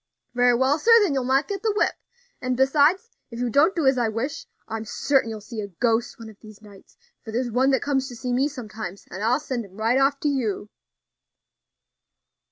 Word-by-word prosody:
"Very 245 0 +4
well, 265 +5 +2
sir, 455 - -1
then 360 -8 +1
you'll 265 -2 0
not 270 +3 +2
get 395 -2 -4
the 440 - +1
whip; - - +2 0.5
and, 255 -1 -1
besides, 295 - +3 0.2
if 235 - -9
you 245 0 -2
don't 315 - +4
do 325 -4 0
as 265 -1 +3
I 235 -2 +1
wish, 230 +7 -4 0.2
I'm 220 0 -4
certain 265 +2 0
you'll 220 -1 -6
see 215 +1 -6
a 205 - -5
ghost 230 +5 -1
one 230 - -10
of 215 -2 -14
these 215 -2 -14
nights; 205 -2 -17 0.3
for 220 - -8
there's 240 +1 -2
one 260 +4 +2
comes 270 -2 0
to 245 - -9
see 245 +1 -3
me 265 +3 +2
sometimes, 215 -8 -8
and 200 - -6
I'll 245 +5 +2
send 260 -5 -4
him 195 -1 -15
right 225 +4 +2
off 275 +1 +2
to - - 0
you." 230 -7 -2
245 Hz, 210 wpm, -24 LUFS, 220-275 Hz, 0.5 s, Very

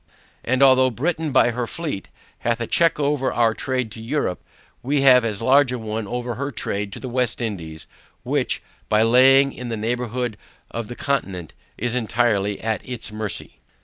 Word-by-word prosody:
And 130 +3 +2
although 130 -1 +6
Britain 155 +5 -2
by 120 - +4
her 120 0 -3
fleet, 150 - -5 0.3
hath 120 0 0
a 120 - -1
check 165 +7 +2
over 145 -2 +1
our 115 -2 +2
trade 130 -1 -2
to 110 - -8
Europe, 115 -6 -2 0.4
we 140 +2 0
have 130 -2 +7
as 110 -1 -2
large 135 +1 +5
a 125 - -2
one 110 -1 -4
over 120 +2 -3
her 140 +3 -3
trade 100 -5 -3
to - - -7
the 130 - -6
West 125 -1 -1
Indies, 85 -9 -5 0.4
which, - - -1 0.3
by 110 +1 +4
laying 135 +4 +5
in 125 -1 -7
the 115 - -3
neighbourhood 120 0 -2 0.3
of 115 -2 -4
the 120 - -7
Continent, 95 - -2 0.2
is 120 +1 -1
entirely 110 -4 +1
at 110 -3 -1
its 125 -3 -4
mercy. 105 -2 -5
120 Hz, 180 wpm, -22 LUFS, 110-130 Hz, 0.4 s, have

